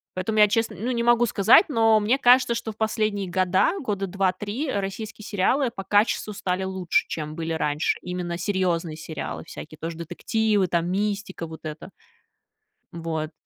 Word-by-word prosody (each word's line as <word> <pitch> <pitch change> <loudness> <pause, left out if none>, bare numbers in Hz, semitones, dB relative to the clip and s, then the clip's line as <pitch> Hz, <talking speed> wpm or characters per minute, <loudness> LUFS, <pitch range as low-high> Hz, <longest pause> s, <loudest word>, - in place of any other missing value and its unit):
Поэтому 215 +4 -1
я 210 - +8
честно, 225 +2 0
ну, 235 +5 -2
не 235 -1 -1
могу 240 0 +4
сказать, 215 - +6
но 225 -5 +4
мне 220 +6 +2
кажется, 250 -2 +5
что 230 -1 -4
в 210 - -16
последние 215 -3 -1
года, 185 - +2
года 200 - -2
2-3, 195 - -1
российские 210 +2 -4
сериалы 230 +7 +1
по 195 -4 -7
качеству 210 +1 +1
стали 185 -1 -2
лучше, 190 -2 0
чем 155 -1 -5
были 165 -1 -3
раньше, 150 0 0
именно 180 -1 -4
серьезные 175 -4 -1
сериалы 160 -2 -6
всякие, 155 -1 -10
тоже 165 +1 -5
детективы, 205 +5 0
там 170 0 0
мистика 200 -3 -2
вот 160 0 -9
эта. 155 0 -7 1.0
Вот. 160 -2 -4
195 Hz, 160 wpm, -24 LUFS, 170-220 Hz, 1.0 s, я